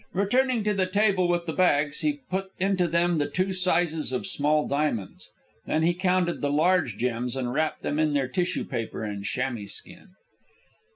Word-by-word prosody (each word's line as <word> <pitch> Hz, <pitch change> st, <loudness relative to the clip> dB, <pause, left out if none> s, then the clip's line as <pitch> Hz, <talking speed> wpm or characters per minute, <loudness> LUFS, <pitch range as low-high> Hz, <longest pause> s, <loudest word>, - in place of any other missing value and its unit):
Returning 240 Hz, +5 st, +1 dB
to 210 Hz, 0 st, +1 dB
the 190 Hz, -2 st, +1 dB
table 195 Hz, -1 st, +2 dB
with 175 Hz, 0 st, 0 dB
the 160 Hz, -, -3 dB
bags, 150 Hz, -5 st, +2 dB
he 295 Hz, -1 st, 0 dB
put 190 Hz, +1 st, -2 dB
into 185 Hz, -2 st, +1 dB
them 170 Hz, 0 st, +1 dB
the 145 Hz, -, 0 dB
two 185 Hz, +1 st, -1 dB
sizes 175 Hz, -5 st, +1 dB
of 125 Hz, -, -2 dB
small 150 Hz, +1 st, +1 dB
diamonds. 140 Hz, -9 st, -2 dB, 0.4 s
Then 160 Hz, -, +1 dB
he 170 Hz, +2 st, +3 dB
counted 180 Hz, -1 st, 0 dB
the 145 Hz, -, 0 dB
large 155 Hz, -, +2 dB
gems 120 Hz, +1 st, -2 dB
and 125 Hz, -2 st, -2 dB
wrapped 155 Hz, +2 st, -1 dB
them 150 Hz, -, -1 dB
in 155 Hz, -1 st, +2 dB
their 140 Hz, -2 st, +1 dB
tissue 175 Hz, +7 st, -1 dB
paper 115 Hz, -3 st, -4 dB
and 100 Hz, -2 st, -4 dB
chamois 120 Hz, -2 st, -3 dB
skin. 185 Hz, -, -10 dB
165 Hz, 180 wpm, -26 LUFS, 140-185 Hz, 0.4 s, he